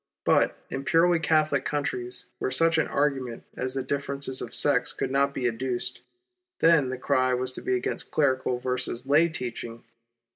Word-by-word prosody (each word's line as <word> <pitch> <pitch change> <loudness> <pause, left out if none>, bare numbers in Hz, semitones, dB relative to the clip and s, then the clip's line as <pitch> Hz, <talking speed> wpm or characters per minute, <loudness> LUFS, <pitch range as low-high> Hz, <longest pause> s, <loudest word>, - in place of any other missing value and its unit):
But - - +3
in 135 - -3
purely 170 +3 +3
Catholic 155 -4 +2
countries, 125 -4 -3
where - - -1
such 165 +5 +3
an - - +1
argument 135 -5 -1
as 130 +1 -4
the 135 - -1
differences 140 -1 -2
of - - -6
sects 140 -4 +2
could - - -3
not 140 +1 +2
be 130 -3 -1
adduced, 125 +1 -2 0.6
then 160 -5 +4
the 130 - -3
cry 130 0 +1
was 130 +1 -2
to - - -7
be 130 - 0
against 125 - -3
clerical 130 -4 +1
versus 125 0 -2
lay 150 +5 +4
teaching. 120 -5 -6
130 Hz, 170 wpm, -26 LUFS, 125-145 Hz, 0.6 s, then